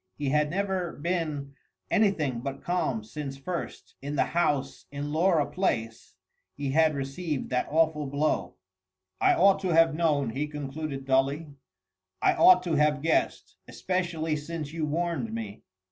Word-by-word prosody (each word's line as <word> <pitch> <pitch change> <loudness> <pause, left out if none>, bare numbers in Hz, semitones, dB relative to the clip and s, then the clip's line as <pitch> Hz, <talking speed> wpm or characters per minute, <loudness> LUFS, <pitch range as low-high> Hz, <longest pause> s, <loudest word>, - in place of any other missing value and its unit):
He 145 -2 -1
had 150 +1 +2
never 190 -1 -1
been 150 -4 -3 0.4
anything 170 - +2
but 135 +3 -6
calm 155 -11 -1
since 135 +4 -6
first, 170 +6 -6
in 145 +2 -4
the - - +3
house 145 -5 -1
in 145 +1 -4
Laura 165 -2 +3
Place, 115 -13 -2 0.4
he 140 -1 -3
had 155 +1 +3
received 140 +2 -4
that 125 0 0
awful 155 -1 +2
blow. 145 +3 -1 0.7
"I - - +5
ought 195 +1 +5
to 190 - -3
have 165 -1 +5
known," 150 -6 +1
he 145 +5 -2
concluded 145 -1 -5
dully, 140 +3 +1 0.7
"I - - +3
ought 180 0 +6
to 175 -3 -2
have 150 -1 +2
guessed. 165 - 0
Especially 175 -4 -2
since 150 0 -5
you 160 -2 -2
warned 160 -7 -2
me." 110 -2 -6
150 Hz, 145 wpm, -27 LUFS, 140-170 Hz, 0.7 s, ought